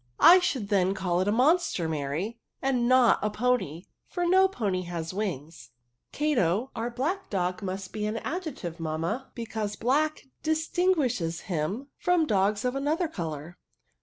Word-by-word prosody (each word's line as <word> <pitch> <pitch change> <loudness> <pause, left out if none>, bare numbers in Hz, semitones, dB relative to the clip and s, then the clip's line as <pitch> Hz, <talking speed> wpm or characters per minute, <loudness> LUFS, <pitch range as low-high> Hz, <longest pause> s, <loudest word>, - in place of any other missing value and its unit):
" - - -41
I 370 - +7
should 260 - -1
then 195 -2 +2
call 180 -2 0
it 190 - 0
a - - +3
monster, 260 - +2
Mary, 160 +9 -3 0.2
and 255 -3 +1
not 255 -2 +5
a 210 - +1
pony, 210 -8 0 0.2
for 355 -1 -2
no 375 +2 +5
pony 205 - -2
has 170 -1 -4
wings," 160 - -4 0.4
'^ - - -52
Cato, 255 - +1
our 230 +2 -2
blac]c 310 +11 -2
dog, 185 +1 -1
must 190 -1 -5
be 210 -1 -2
an 215 +2 -2
ad 335 +10 -3
jective, 175 - -6
mamma, 165 +11 -3
because 220 -3 -4
black 300 +8 +1 0.2
distinguishes* 310 - 0
him 195 - -3
from 355 -2 +3
dog3 205 -2 +1
of 250 +1 0
another 305 +6 0
colour." 165 - -6
215 Hz, 165 wpm, -27 LUFS, 180-275 Hz, 0.4 s, I